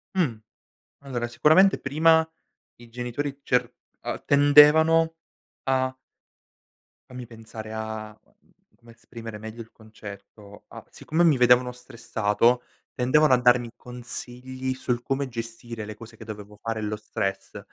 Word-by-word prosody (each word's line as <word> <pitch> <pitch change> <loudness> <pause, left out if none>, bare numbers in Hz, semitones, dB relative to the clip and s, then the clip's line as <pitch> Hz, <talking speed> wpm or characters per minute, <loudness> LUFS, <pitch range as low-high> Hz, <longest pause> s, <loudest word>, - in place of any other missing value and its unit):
Mh! 155 -11 +1 0.7
Allora 120 -3 -3
sicuramente 160 +10 +4
prima 160 +3 +3 0.5
i 120 -1 -15
genitori 125 +4 -4
cer 125 -1 +1 0.3
uhm, - - -5
tendevano 155 +3 +6 0.5
a 130 -1 0 1.1
fammi 125 -1 -8
pensare 110 -1 -10
a 110 -1 -5
mhmm, - - -33 0.2
come 120 0 -18
esprimere 115 -1 -10
meglio 110 +2 -8
il 115 - -13
concetto. 105 -1 -13
Ah, - - -11
siccome 165 +3 -1
mi 155 -6 +5
vedevano 125 0 +4
stressato 120 -1 0 0.3
tendevano 130 +3 +3
a 125 - +6
darmi 120 -1 +3
consigli 125 +1 -6
sul 125 -2 -2
come 135 +1 -2
gestire 115 -1 -7
le 110 0 -8
cose 115 +1 -13
che 110 - -11
dovevo 105 -1 -9
fare 115 -1 -3
e - - -5
lo 105 0 -3
stress, 100 -2 -4
120 Hz, 130 wpm, -25 LUFS, 110-130 Hz, 1.1 s, tendevano